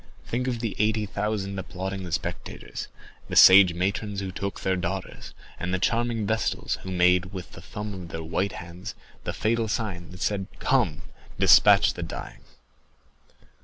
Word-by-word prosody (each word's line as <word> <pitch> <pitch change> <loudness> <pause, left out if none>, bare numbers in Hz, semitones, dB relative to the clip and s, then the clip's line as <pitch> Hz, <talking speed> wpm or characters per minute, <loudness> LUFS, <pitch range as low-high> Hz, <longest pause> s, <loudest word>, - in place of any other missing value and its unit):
Think 125 +2 -2
of 120 -3 -2
the 115 -4 -2
eighty 105 0 +2
thousand 100 -1 -2
applauding 95 0 -5
spectators, - - -5 0.4
the - - -4
sage 95 -2 +9
matrons 100 +3 -1
who 95 -1 -4
took 100 +1 -4
their 95 0 +1
daughters, 95 +1 -5 0.2
and 90 - -3
the 95 - +1
charming 115 +3 0
Vestals 110 +2 -1
who 95 - -7
made 90 0 +3
with 95 -2 -7
the - - -11
thumb 105 0 -6
of 90 -3 -7
their 80 -1 -6
white 85 +5 -1
hands 90 +5 -8 0.3
the - - -1
fatal 115 +1 0
sign 95 -5 -3
that 90 +1 -11
said, 95 -2 -1
'Come, 115 - +1 0.3
despatch - - +6
the - - -7
dying. - - -7
95 Hz, 160 wpm, -26 LUFS, 90-105 Hz, 0.4 s, sage